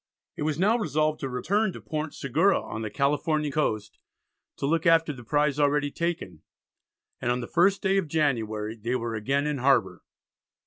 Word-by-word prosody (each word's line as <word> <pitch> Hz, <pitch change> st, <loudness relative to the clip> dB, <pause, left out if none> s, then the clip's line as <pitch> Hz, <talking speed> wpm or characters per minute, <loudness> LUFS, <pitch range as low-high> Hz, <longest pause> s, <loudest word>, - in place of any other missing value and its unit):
It -, -, -8 dB
was 150 Hz, -1 st, 0 dB
now 210 Hz, +7 st, +3 dB
resolved 155 Hz, -, 0 dB
to 135 Hz, -, -3 dB
return 195 Hz, -, 0 dB
to -, -, -8 dB
Port 155 Hz, -1 st, -4 dB
Segura 160 Hz, +9 st, +2 dB
on 110 Hz, -, -6 dB
the 110 Hz, -, -3 dB
Californian 150 Hz, +3 st, 0 dB
coast 110 Hz, -8 st, -2 dB, 0.6 s
to -, -, -2 dB
look 165 Hz, +3 st, +1 dB
after 165 Hz, -2 st, +4 dB
the 125 Hz, -3 st, -11 dB
prize 145 Hz, +3 st, +1 dB
already 145 Hz, 0 st, +2 dB
taken, 165 Hz, -, -3 dB, 0.8 s
and 120 Hz, -, 0 dB
on 125 Hz, -, 0 dB
the 120 Hz, -, -5 dB
1st 190 Hz, +4 st, +3 dB
day 195 Hz, -1 st, +2 dB
of 180 Hz, -, -3 dB
January 115 Hz, -8 st, -1 dB
they 115 Hz, +3 st, -2 dB
were 120 Hz, -2 st, -2 dB
again 135 Hz, +7 st, 0 dB
in 150 Hz, -2 st, -1 dB
harbour. 135 Hz, +2 st, +2 dB
145 Hz, 180 wpm, -26 LUFS, 125-160 Hz, 0.8 s, after